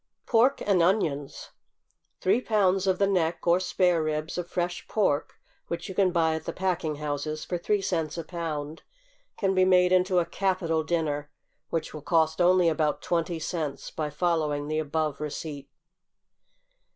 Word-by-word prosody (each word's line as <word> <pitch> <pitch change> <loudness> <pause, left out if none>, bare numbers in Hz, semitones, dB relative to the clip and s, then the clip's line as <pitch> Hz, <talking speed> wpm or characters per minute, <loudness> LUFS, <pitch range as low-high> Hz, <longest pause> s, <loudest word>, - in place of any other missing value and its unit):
=Pork 250 +4 +3
and 195 -4 +3
Onions.= 165 -6 0 0.7
Three 210 +6 +3
pounds 195 -5 +2
of 190 -1 +2
the 200 - +3
neck, 175 -4 0
or 175 +1 +4
spare 180 -2 +2
ribs, 155 +1 -2
of 175 -1 -4
fresh 175 0 -3
pork, 170 -9 0 0.3
which 170 0 -4
you 190 - -6
can 185 -1 +3
buy 165 -2 +2
at 160 0 -4
the - - -3
packing 180 -5 -1
houses 150 +1 -4
for 175 - -3
three 205 +3 0
cents 165 -4 -1
a 165 - -3
pound, 160 -2 -5 0.6
can 195 -2 +1
be 185 -1 +4
made 180 -1 +4
into 185 0 +3
a 175 - +3
capital 175 -5 0
dinner, 150 -3 -1 0.4
which 165 - -3
will 155 - -7
cost 160 +1 +1
only 180 0 +5
about 155 -2 0
twenty 170 0 -1
cents, 155 -3 -4
by 155 -1 -3
following 150 -2 0
the 155 0 0
above 155 -1 -2
receipt. 150 -1 -5
170 Hz, 165 wpm, -27 LUFS, 155-185 Hz, 0.7 s, only